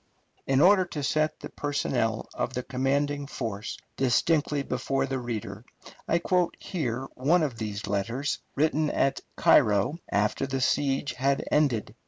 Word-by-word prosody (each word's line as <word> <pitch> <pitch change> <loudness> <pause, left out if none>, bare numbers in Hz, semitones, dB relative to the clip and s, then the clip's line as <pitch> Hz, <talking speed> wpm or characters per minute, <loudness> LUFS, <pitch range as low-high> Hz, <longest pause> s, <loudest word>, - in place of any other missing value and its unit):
In 135 0 +3
order 190 +2 +6
to 150 -4 -5
set 155 +3 0
the - - -7
personnel 125 -6 -1
of 130 - -3
the 125 - -2
commanding 140 +2 -1
force 110 -6 -5 0.2
distinctly 145 +3 +2
before 135 +1 -1
the 135 -1 -2
reader, 110 -3 -5 0.4
I 170 - +3
quote 180 0 +1
here 135 - -3
one 155 +7 +2
of 130 -6 -3
these 105 -2 -4
letters, 115 +8 -1 0.2
written 155 +1 +2
at 135 -1 +1
Cairo 105 - +4
after 105 +6 0
the 135 0 -2
siege 135 +2 +1
had 135 +2 0
ended. 140 -8 +1
135 Hz, 145 wpm, -27 LUFS, 120-150 Hz, 0.4 s, order